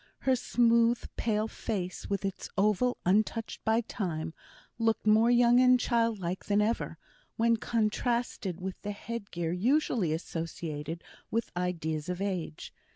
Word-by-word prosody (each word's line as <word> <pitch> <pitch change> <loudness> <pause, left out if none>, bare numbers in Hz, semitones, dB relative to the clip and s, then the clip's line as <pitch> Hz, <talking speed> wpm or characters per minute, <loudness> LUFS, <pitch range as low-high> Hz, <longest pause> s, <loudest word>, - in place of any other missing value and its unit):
Her 260 -1 +3
smooth, 235 0 +3
pale 215 -1 0
face, 190 -5 -4
with 200 -1 -1
its 195 -1 -4
oval 215 +5 +2
untouched 215 +4 +1
by 225 +1 +3
time, 165 -8 -4 0.5
looked 225 -1 +1
more 215 +2 +5
young 240 0 +5
and 255 0 +6
childlike 225 -8 0
than 205 0 +2
ever, 220 +3 0 0.4
when 230 0 +3
contrasted 225 -4 -1
with 185 0 -5
the 205 0 -4
head 230 0 -6
gear 170 -2 -2
usually 220 - +1
associated 160 -1 -4 0.3
with 230 0 -1
ideas 165 -3 -2
of 180 0 -2
age. 185 -6 -4
210 Hz, 135 wpm, -30 LUFS, 180-230 Hz, 0.5 s, and